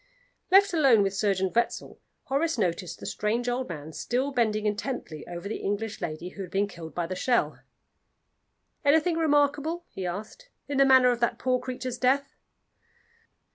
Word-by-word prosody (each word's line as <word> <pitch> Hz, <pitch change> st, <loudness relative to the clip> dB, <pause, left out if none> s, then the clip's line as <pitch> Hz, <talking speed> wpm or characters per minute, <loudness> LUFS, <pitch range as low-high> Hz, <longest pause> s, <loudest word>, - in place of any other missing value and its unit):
Left 395 Hz, +1 st, +6 dB
alone 270 Hz, -10 st, +5 dB
with 195 Hz, -1 st, -1 dB
Surgeon 195 Hz, -2 st, 0 dB
Wetzel, 235 Hz, -, -1 dB, 0.2 s
Horace 295 Hz, +2 st, 0 dB
noticed 175 Hz, -4 st, -2 dB
the -, -, -9 dB
strange 230 Hz, +4 st, -1 dB
old 245 Hz, -1 st, -1 dB
man 155 Hz, -1 st, -7 dB
still 255 Hz, -, -1 dB
bending 220 Hz, -4 st, +1 dB
intently 210 Hz, -, -3 dB
over 175 Hz, +2 st, -6 dB
the 215 Hz, -, -3 dB
English 205 Hz, +2 st, -3 dB
lady 170 Hz, +1 st, -4 dB
who 195 Hz, -, -9 dB
had 185 Hz, -, -6 dB
been 195 Hz, +3 st, +1 dB
killed 165 Hz, -4 st, -10 dB
by 175 Hz, -, -1 dB
the 185 Hz, +2 st, -4 dB
shell. 240 Hz, +6 st, +1 dB, 1.2 s
"Anything 320 Hz, +4 st, +3 dB
remarkable," 300 Hz, +2 st, +1 dB
he 185 Hz, -2 st, -4 dB
asked, 215 Hz, -, -7 dB, 0.2 s
"in 285 Hz, -, -2 dB
the 275 Hz, -, +7 dB
manner 260 Hz, -2 st, +6 dB
of 240 Hz, -, -2 dB
that 235 Hz, -, +1 dB
poor 255 Hz, 0 st, +1 dB
creature's 255 Hz, -1 st, -5 dB
death?" 275 Hz, +2 st, +1 dB
235 Hz, 165 wpm, -27 LUFS, 195-275 Hz, 1.2 s, the